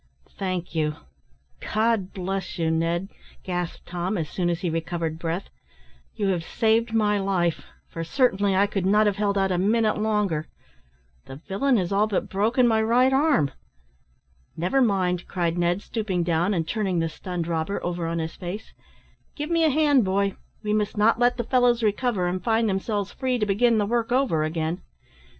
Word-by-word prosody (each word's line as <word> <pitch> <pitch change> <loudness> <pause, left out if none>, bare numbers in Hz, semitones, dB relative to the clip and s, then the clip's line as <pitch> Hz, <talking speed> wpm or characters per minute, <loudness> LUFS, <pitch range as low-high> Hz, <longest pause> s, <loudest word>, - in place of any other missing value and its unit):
"Thank 185 -3 -4
you 155 -2 0 0.6
God 215 -3 0
bless 190 0 -4
you, 165 -1 +1
Ned," 170 +3 0 0.3
gasped 180 -2 -4
Tom, 180 +4 -2
as 160 -3 -3
soon 175 -2 0
as 170 0 -2
he 180 - -1
recovered 165 -1 -3
breath; 170 +3 -3 0.6
"you 200 -2 0
have 175 -3 0
saved 225 +5 +1
my 210 -2 +2
life, 185 -4 0 0.2
for 165 - -5
certainly 200 -1 +2
I 195 +2 +4
could 200 -2 -2
not 210 +2 +4
have 205 -1 +1
held 200 -1 0
out 195 -1 +1
a 180 - +1
minute 215 +2 +2
longer. 210 -8 0 0.8
The 135 - -9
villain 200 - 0
has 180 -2 -1
all 205 +2 +3
but 205 - -2
broken 230 +6 +2
my 220 -1 +3
right 245 +4 +3
arm." 270 - +3 1.1
"Never 180 +11 +1
mind," 185 -6 +1
cried 170 -2 -1
Ned, 175 +3 +1
stooping 200 -6 -2
down, 175 +4 +1
and 165 -2 -1
turning 195 -4 -1
the 165 0 +1
stunned 175 +2 -5
robber 165 +3 -2
over 175 -1 -2
on 165 0 -2
his 160 0 -3
face, 185 +5 -7 0.6
"give 300 +2 -4
me 335 -1 +3
a 315 - +5
hand, 290 -3 +4
boy; 195 0 0 0.3
we 210 0 0
must 210 0 -1
not 220 +2 +3
let 245 0 +3
the 240 - -1
fellows 245 -1 +2
recover 210 -2 +1
and 180 +1 -2
find 225 0 +2
themselves 200 0 -1
free 255 -1 -1
to 215 - 0
begin 220 +3 +3
the 210 - +2
work 235 +2 -1
over 245 - +2
again. 160 +3 -2
195 Hz, 180 wpm, -25 LUFS, 175-220 Hz, 1.1 s, a